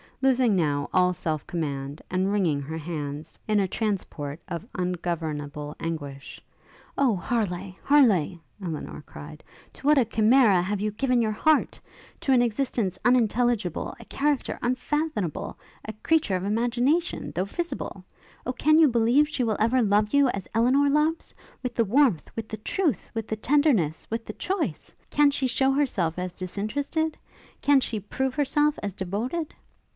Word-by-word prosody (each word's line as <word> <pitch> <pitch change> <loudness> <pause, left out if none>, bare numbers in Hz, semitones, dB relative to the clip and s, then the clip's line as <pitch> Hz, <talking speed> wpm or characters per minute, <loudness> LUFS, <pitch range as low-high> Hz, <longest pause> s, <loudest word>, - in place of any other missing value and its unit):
Losing 255 -5 +4
now 145 -5 0
all 180 0 +4
self 155 -4 -3
command, 145 -3 -4
and 185 +2 0
wringing 175 -9 +1
her 160 +3 -5
hands, 150 -1 -5
in 215 -1 +3
a 195 - +2
transport 180 -8 -3
of 180 +3 -5
ungovernable 160 -5 -3
anguish, 145 -4 -6 0.6
'Oh, 260 -6 +3
Harleigh! 190 -3 -2
Harleigh!' 210 - +4 0.2
Elinor 165 -4 -5
cried, - - -11 0.3
'to - - -14
what 300 0 +5
a 250 - +3
chimera 225 -1 +4 0.2
you 205 +2 -1
have 210 - -12
given 250 -1 +2
your 215 - 0
heart! 310 +8 +2 0.4
to 270 - 0
an 250 -2 +5
existence 230 -5 -1
unintelligible, 240 -6 +1
a 230 - -12
character 285 +2 -1
unfathomable, 255 - -2 0.3
a 220 - -5
creature 315 -12 +2
of 180 - -2
imagination, 245 - 0
though 180 - 0
visible! 340 - -5 0.4
O, 255 - -1
can 310 +4 +3
you 320 - +7
believe 245 +4 +3
she 260 - -1
will 220 -3 0
ever 235 +4 +3
love 210 +2 +2
you 285 -2 +5
as 195 -5 -4
Elinor 255 +5 +3
loves? 300 +3 +1 0.3
with 250 -1 -3
the 230 - +2
warmth, 240 - +2
with 225 -1 -4
the 215 - -6
truth, 315 - -1
with 225 -2 -4
the 220 - -2
tenderness, 230 - +2
with 225 0 -3
the 215 - -6
choice? 375 - -3 0.2
can 295 -1 +5
she 275 -2 0
show 265 +2 +2
herself 210 - 0
as 180 -1 -4
disinterested? 280 - -2 0.4
can 285 -1 +5
she 225 -4 -3
prove 260 +6 -2
herself 295 +1 +2
as 200 -2 -3
devoted? 220 - -3
220 Hz, 155 wpm, -26 LUFS, 180-270 Hz, 0.6 s, you